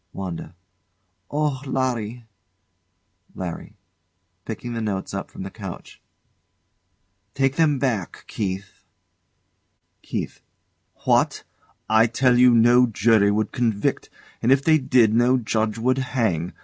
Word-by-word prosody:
WANDA. 90 Hz, -3 st, -6 dB, 0.7 s
Oh, 145 Hz, -3 st, -1 dB
Larry! 125 Hz, -4 st, -2 dB, 1.1 s
LARRY. 90 Hz, -3 st, -7 dB, 0.7 s
[Picking 120 Hz, +2 st, -6 dB
the 115 Hz, -, -3 dB
notes 100 Hz, -3 st, -3 dB
up 100 Hz, -, -5 dB
from -, -, -8 dB
the 95 Hz, -, -7 dB
couch] 95 Hz, -4 st, -9 dB, 1.3 s
Take 135 Hz, 0 st, +1 dB
them 155 Hz, -3 st, +3 dB
back, 120 Hz, -9 st, -2 dB
Keith. 95 Hz, -1 st, -5 dB, 1.2 s
KEITH. -, -, -5 dB, 0.6 s
What! -, -, +2 dB, 0.4 s
I 110 Hz, +1 st, +4 dB
tell 125 Hz, +1 st, +2 dB
you 125 Hz, 0 st, +7 dB
no 120 Hz, +2 st, +5 dB
jury 110 Hz, -1 st, +3 dB
would 105 Hz, +1 st, 0 dB
convict; 115 Hz, -5 st, -1 dB, 0.3 s
and 120 Hz, -, +2 dB
if 135 Hz, 0 st, +4 dB
they 155 Hz, 0 st, +4 dB
did, 125 Hz, -5 st, +3 dB
no 120 Hz, +3 st, +3 dB
judge 110 Hz, -2 st, -1 dB
would 130 Hz, +3 st, +1 dB
hang. 110 Hz, -10 st, -1 dB
115 Hz, 115 wpm, -23 LUFS, 105-130 Hz, 1.3 s, you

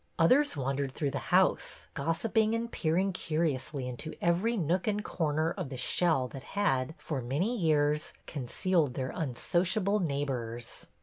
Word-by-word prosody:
Others 255 Hz, -, +4 dB
wandered 135 Hz, 0 st, -1 dB
through 140 Hz, +1 st, -2 dB
the 140 Hz, -, -5 dB
house, 185 Hz, +1 st, +2 dB
gos 165 Hz, +3 st, -1 dB
siping 220 Hz, 0 st, +2 dB
and 230 Hz, +1 st, -3 dB
peering 185 Hz, +4 st, +1 dB
curiously 155 Hz, -5 st, -1 dB
into 125 Hz, +6 st, -6 dB
every 185 Hz, +8 st, +2 dB
nook 180 Hz, +2 st, 0 dB
and 210 Hz, 0 st, 0 dB
corner 155 Hz, -1 st, 0 dB
of 180 Hz, -7 st, -4 dB
the 130 Hz, -, -6 dB
shell 135 Hz, +1 st, +2 dB
that 135 Hz, -, -8 dB, 0.2 s
had, 145 Hz, -7 st, +1 dB
for 145 Hz, -5 st, -3 dB
many 150 Hz, -, 0 dB
years, 150 Hz, -5 st, +2 dB
con 135 Hz, -5 st, -5 dB
cealed 165 Hz, -5 st, +1 dB
their 130 Hz, -1 st, -2 dB
unsociable 185 Hz, -, +1 dB
neighbors. 130 Hz, -, -3 dB
160 Hz, 150 wpm, -30 LUFS, 135-185 Hz, 0.2 s, Others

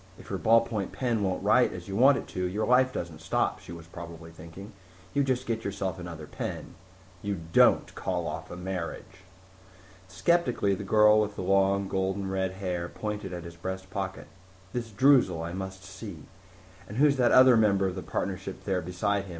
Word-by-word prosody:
If -, -, -12 dB
your 95 Hz, -, -2 dB
ballpoint 110 Hz, +1 st, +2 dB
pen 120 Hz, -4 st, -1 dB
won't 95 Hz, -2 st, -1 dB
write -, -, +4 dB
as -, -, -8 dB
you 95 Hz, -, -5 dB
want 135 Hz, +5 st, +6 dB
it -, -, -5 dB
to, 90 Hz, -, -3 dB
your 105 Hz, +4 st, -1 dB
life 130 Hz, +1 st, +4 dB
doesn't 80 Hz, -6 st, -6 dB
stop, -, -, 0 dB
she -, -, -12 dB
probably 85 Hz, 0 st, -9 dB
was -, -, -20 dB
thinking. 85 Hz, +7 st, -11 dB, 0.4 s
You 140 Hz, -, +2 dB
just 130 Hz, -1 st, -1 dB
get 115 Hz, -1 st, -2 dB
yourself 95 Hz, -2 st, -3 dB
another 85 Hz, -3 st, -7 dB
pen -, -, -6 dB, 0.5 s
You 100 Hz, -3 st, -3 dB
don't -, -, +5 dB
call -, -, -2 dB
off -, -, -5 dB
a -, -, -7 dB
marriage.... 90 Hz, 0 st, -6 dB, 0.9 s
Skeptically 110 Hz, -, +1 dB
the 95 Hz, -, -4 dB
girl 105 Hz, +1 st, +5 dB
with 105 Hz, -1 st, -2 dB
the -, -, -4 dB
long, 100 Hz, +1 st, +2 dB
golden 95 Hz, +1 st, -1 dB
red 95 Hz, -1 st, -1 dB
hair 90 Hz, -3 st, -3 dB
pointed 105 Hz, -3 st, -5 dB
at 90 Hz, -2 st, -6 dB
his 85 Hz, -1 st, -9 dB
breast 95 Hz, +2 st, -6 dB
pocket. 95 Hz, -1 st, -4 dB, 0.5 s
"This 120 Hz, -2 st, -3 dB
Droozle 110 Hz, -, +4 dB
I 85 Hz, -, -5 dB
must 95 Hz, 0 st, -6 dB
see. 95 Hz, -3 st, -9 dB, 0.6 s
And 105 Hz, -, -7 dB
who's 140 Hz, 0 st, +4 dB
that 125 Hz, -2 st, +3 dB
other 130 Hz, -1 st, +8 dB
member 100 Hz, -3 st, +3 dB
of 95 Hz, -, -1 dB
the 95 Hz, -, -5 dB
partnership 95 Hz, 0 st, -4 dB
there 95 Hz, -2 st, 0 dB
beside 95 Hz, +4 st, -1 dB
him? -, -, -12 dB
95 Hz, 190 wpm, -28 LUFS, 90-110 Hz, 0.9 s, other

